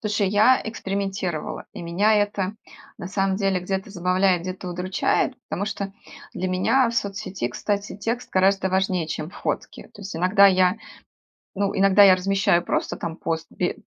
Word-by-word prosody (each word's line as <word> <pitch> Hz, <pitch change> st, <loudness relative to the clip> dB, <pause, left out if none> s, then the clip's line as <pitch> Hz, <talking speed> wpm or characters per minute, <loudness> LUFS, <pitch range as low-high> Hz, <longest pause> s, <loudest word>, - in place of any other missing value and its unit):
Слушай, 205 Hz, -2 st, 0 dB
я 215 Hz, +6 st, +4 dB
экспериментировала, 195 Hz, -6 st, -4 dB
и -, -, -8 dB
меня 180 Hz, +6 st, +1 dB
это 205 Hz, -1 st, 0 dB, 0.4 s
на 175 Hz, -, -6 dB
самом 195 Hz, -1 st, 0 dB
деле 195 Hz, -3 st, 0 dB
где-то 190 Hz, +2 st, -3 dB
забавляет, 180 Hz, -1 st, +1 dB
где-то 185 Hz, 0 st, -6 dB
удручает, 180 Hz, +7 st, 0 dB
потому 200 Hz, -, -2 dB
что 200 Hz, -2 st, -4 dB, 0.4 s
для 185 Hz, -, -2 dB
меня 230 Hz, +8 st, +2 dB
в -, -, -6 dB
соцсети, 195 Hz, -, -3 dB
кстати, 200 Hz, -, -3 dB
текст 230 Hz, +4 st, -3 dB
гораздо 190 Hz, 0 st, +2 dB
важнее, 185 Hz, -3 st, 0 dB
чем 155 Hz, +1 st, -5 dB
фотки. -, -, -4 dB
То 205 Hz, -, -11 dB
есть 190 Hz, -3 st, -7 dB
иногда 185 Hz, +4 st, +5 dB
я 185 Hz, 0 st, +3 dB, 0.8 s
ну, 200 Hz, 0 st, -1 dB
иногда 195 Hz, +1 st, +5 dB
я 190 Hz, -2 st, +8 dB
размещаю 190 Hz, -2 st, +1 dB
просто -, -, -2 dB
там 165 Hz, 0 st, -5 dB
пост 165 Hz, 0 st, -3 dB
бе 180 Hz, -, -2 dB
190 Hz, 160 wpm, -23 LUFS, 180-200 Hz, 0.8 s, я